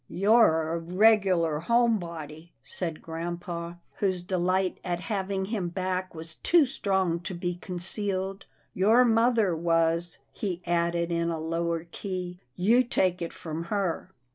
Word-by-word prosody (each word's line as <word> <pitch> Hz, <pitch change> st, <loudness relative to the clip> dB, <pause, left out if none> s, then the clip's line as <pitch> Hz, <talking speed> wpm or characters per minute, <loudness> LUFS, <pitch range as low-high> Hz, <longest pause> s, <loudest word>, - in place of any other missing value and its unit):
" -, -, -45 dB
You're 165 Hz, -8 st, +5 dB
a 170 Hz, -, -1 dB
regular 180 Hz, -3 st, +3 dB
home 235 Hz, +4 st, +3 dB
body," 165 Hz, -1 st, -8 dB
said 165 Hz, -4 st, -5 dB
grampa, 170 Hz, +1 st, -5 dB, 0.2 s
whose 185 Hz, -3 st, 0 dB
delight 185 Hz, +1 st, 0 dB
at 175 Hz, -1 st, -2 dB
having 195 Hz, -2 st, -2 dB
him 195 Hz, -4 st, -2 dB
back 185 Hz, 0 st, -3 dB
was 160 Hz, 0 st, -6 dB
too 340 Hz, -4 st, +5 dB
strong 190 Hz, -9 st, 0 dB
to 185 Hz, +2 st, -6 dB
be 175 Hz, +1 st, -2 dB
concealed. 190 Hz, +1 st, -3 dB
" -, -, -40 dB
Your 230 Hz, +5 st, +6 dB
mother 225 Hz, -5 st, +3 dB
was," 165 Hz, +1 st, +1 dB, 0.2 s
he 185 Hz, -4 st, -4 dB
added 170 Hz, 0 st, 0 dB
in 170 Hz, 0 st, 0 dB
a 165 Hz, -1 st, -2 dB
lower 165 Hz, +1 st, -1 dB
key. 180 Hz, 0 st, -5 dB
" 125 Hz, -, -47 dB
You 245 Hz, +3 st, +6 dB
take 185 Hz, -7 st, 0 dB
it 170 Hz, -, -3 dB
from 160 Hz, 0 st, -6 dB
her." 190 Hz, -3 st, -2 dB
180 Hz, 150 wpm, -27 LUFS, 170-195 Hz, 0.2 s, Your